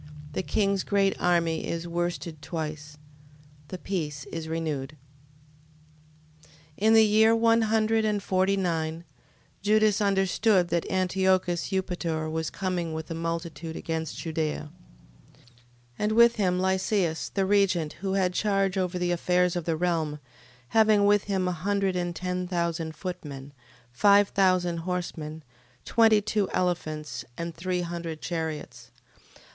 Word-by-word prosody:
The - - -1
king's 200 0 0
great 195 -1 +2
army 170 -2 +1
is 170 +1 -3
worsted 170 -2 -3
twice. 155 -1 -5 0.7
The 185 - -6
peace 150 -7 -4
is 160 -1 -5
renewed. 155 -3 -3 1.5
13:1. - - -22 0.3
In 220 +2 +4
the 220 0 +7
year 220 +2 +5
one 230 0 +4
hundred 220 0 +2
and 210 -2 0
forty 190 +1 +1
nine, 165 -3 -2 0.6
Judas 215 +1 +3
understood 195 -1 +2
that 170 0 -1
Antiochus 185 -1 +1
Eupator 175 -4 -2
was 160 0 -2
coming 180 -4 -3
with 160 +1 -6
a - - -1
multitude 165 -1 -4
against 160 -1 -4
Judea, 155 -2 -3 0.7
13:2. - - -25 0.6
And 210 +1 +1
with 235 +1 +6
him 180 -3 +1
Lysias, 190 -2 0
the 195 -1 0
regent, 190 -6 +2
who 195 -1 -1
had 185 -2 +1
charge 195 -1 +1
over 180 -1 -1
the 180 0 0
affairs 180 +1 +1
of 175 -2 -3
the 165 -2 0
realm, 160 -3 0 0.5
having 215 -2 +4
with 205 0 +3
him 190 -2 0
a - - +1
hundred 195 +2 -1
and 175 -1 -2
ten 180 0 -3
thousand 170 -2 -2
footmen, 145 -6 -7 0.4
five 200 +9 +5
thousand 185 -3 +2
horsemen, 165 -3 -4 0.4
twenty 220 -2 +4
two 210 -2 0
elephants, 155 -4 -2
and 170 0 -4
three 180 +2 -2
hundred 170 -2 -5
chariots. 155 -8 -5
180 Hz, 135 wpm, -27 LUFS, 160-195 Hz, 1.5 s, the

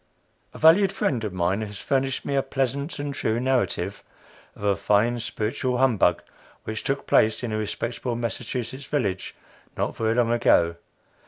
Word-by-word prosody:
A - - -7
valued 180 +5 +6
friend 135 - -1
of 105 - -2
mine 90 +3 0
has 105 -2 -6
furnished 135 -1 -1
me 140 - -2
a 135 - +3
pleasant 135 +3 -2
and 145 0 -3
true 110 -3 0
narrative 130 0 0 0.5
of - - -12
a 100 -1 +3
fine 115 +5 +2
"spiritual" 125 +3 -2
humbug 115 -9 +3 0.4
which 110 0 -5
took 135 +1 -2
place 110 +3 +3
in 120 - -2
a 110 - -1
respectable 115 +3 -3
Massachusetts 125 +2 -4
village 100 -12 -2 0.4
not - - -1
very 110 0 0
long 120 -1 +2
ago. 85 -8 +3
120 Hz, 160 wpm, -25 LUFS, 110-135 Hz, 0.5 s, valued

